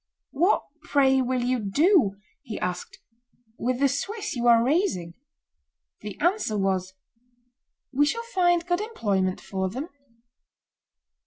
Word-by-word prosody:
"What, 345 +8 +2 0.2
pray, 270 -5 +3
will 255 -1 -1
you 250 0 +1
do," 240 - +3 0.3
he 220 - -6
asked, 180 0 -4 0.6
"with 250 +1 -1
the 280 - +4
Swiss 390 - -3
you 240 0 0
are 230 -1 +6
raising?" 240 - 0 0.9
The 210 -1 -8
answer 345 - +1
was, 190 -1 -1 1.0
"We 290 +2 +3
shall 460 +8 -1
find 350 -2 +3
good 350 +2 0
employment 200 - -1
for 190 -1 -3
them." 265 - -5
255 Hz, 120 wpm, -25 LUFS, -, 1.0 s, are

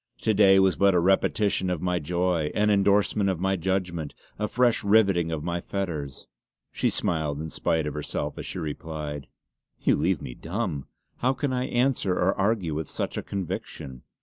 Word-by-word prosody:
To 110 - +2
day 95 -1 +6
was 95 -1 +4
but 100 -1 +4
a - - +5
repetition 95 +1 +2
of 90 -3 -1
my 90 +1 0
joy; 85 0 0
an 105 0 +3
endorsement 100 0 +3
of 95 -3 -1
my 95 +1 +1
judgment; 90 -4 -2 0.2
a 105 - 0
fresh 120 +1 +2
rivetting 100 -5 +3
of 80 -2 -3
my 85 0 -2
fetters!" 80 -10 -4 0.5
She - - 0
smiled 75 -3 -1
in 80 0 -5
spite 80 -2 0
of 75 - -3
herself 75 - -4
as - - -6
she - - -6
replied: 75 -2 -5 0.5
"You - - +3
leave 85 +2 +1
me - - -7
dumb. 85 - -4 0.3
How 130 +2 +1
can 135 0 -2
I 125 0 0
answer 125 -7 +1
or 90 +2 +2
argue 95 -5 0
with 75 -1 -4
such - - -3
a - - -2
conviction." 75 -8 -5
90 Hz, 180 wpm, -26 LUFS, 80-100 Hz, 0.5 s, day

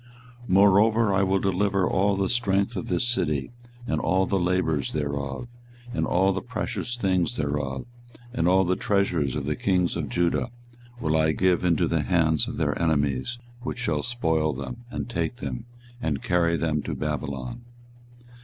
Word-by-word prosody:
24:020:005 - - -13
Moreover 100 +3 +5
I 95 - +3
will 95 0 +2
deliver 95 0 +1
all 100 +1 +2
the 95 0 0
strength 100 -3 +1
of 90 - -4
this 90 +7 0
city, 75 - -1 0.3
and 125 - -1
all 95 +1 +2
the 95 0 0
labours 85 -5 0
thereof, 70 - -3 0.5
and - - 0
all 95 +2 +3
the 95 - -2
precious 120 -1 -4
things 95 +1 0
thereof, 70 -2 -2 0.5
and 85 -8 +1
all 95 +1 +5
the 90 0 +1
treasures 90 -11 +1
of 75 -2 -2
the 75 +1 -1
kings 90 +1 +1
of - - -3
Judah 85 +7 +1 0.5
will 80 -5 0
I 80 0 +3
give 90 0 +2
into 85 -3 +2
the - - +1
hand 80 -3 +2
of - - -5
their - - 0
enemies, 75 - 0 0.2
which 125 - -4
shall 125 - 0
spoil 80 -11 0
them, 70 - -7
and - - -4
take 120 +1 -2
them, 120 -1 -5 0.4
and 75 -8 -1
carry 85 -1 +2
them 80 -2 0
to - - -4
Babylon. 70 - -4
90 Hz, 170 wpm, -26 LUFS, 75-100 Hz, 0.5 s, Moreover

